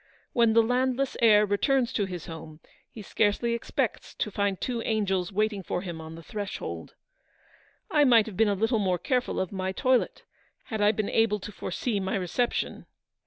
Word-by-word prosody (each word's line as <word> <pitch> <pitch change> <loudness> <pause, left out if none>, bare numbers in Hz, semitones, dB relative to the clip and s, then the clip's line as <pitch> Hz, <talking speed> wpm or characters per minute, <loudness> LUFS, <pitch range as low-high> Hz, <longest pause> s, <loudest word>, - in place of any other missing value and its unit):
"When 230 -2 +4
the 230 0 +6
landless 255 +3 0
heir 210 -2 +6
returns 250 +5 +1
to 205 - +1
his 180 -3 -6
home, 160 -1 -9 0.3
he 215 - -10
scarcely 215 +4 +1
expects 235 - -2
to 210 - -2
find 200 -1 0
two 240 -2 -2
angels 195 -5 0
wait 215 +2 +1
ing 200 - -5
for 180 0 -3
him 170 -4 -6
on 160 0 -9
the 165 - -11
threshold. 205 +3 -6 1.0
I 300 -4 +5
might 235 -5 +6
have 215 - -8
been 225 +3 +3
a 205 - +2
little 225 +3 +1
more 185 -3 +1
careful 250 +4 -1
of 190 - -2
my 190 -1 -2
toilet, 255 +6 +1 0.4
had 220 -2 -4
I 205 0 +5
been 215 -1 -2
able 225 -2 +2
to 210 - -7
foresee 205 +3 -2
my 190 0 -2
reception. 195 +6 -1
210 Hz, 185 wpm, -27 LUFS, 190-235 Hz, 1.0 s, the